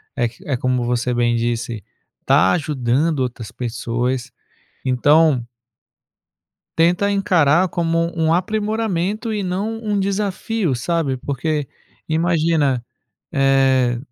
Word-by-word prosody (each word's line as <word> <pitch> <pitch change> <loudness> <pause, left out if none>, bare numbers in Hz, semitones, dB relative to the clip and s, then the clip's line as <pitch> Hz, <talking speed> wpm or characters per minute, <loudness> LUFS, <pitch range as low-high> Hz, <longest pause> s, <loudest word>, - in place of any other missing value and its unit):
é 120 - +1
que 115 +2 -13
é 140 - 0
como 125 -1 0
você 125 +1 0
bem 120 -1 +1
disse, 115 -2 -2 0.4
tá 95 - +4
ajudando 145 0 0
outras 120 -3 -4
pessoas. 120 +1 -3 0.5
Então 140 0 +3 1.3
tenta 180 +5 +3
encarar 180 -4 +3
como 165 -1 0
um 160 0 +2
aprimoramento 215 +2 -1
e 205 - -2
não 195 +5 -2
um 205 -2 0
desafio, 200 - -1
sabe. 140 +1 -1
Porque 140 +2 -2 0.4
imagina, 160 -5 +1 0.5
eh, 135 -3 +3
150 Hz, 105 wpm, -20 LUFS, 125-180 Hz, 1.3 s, tá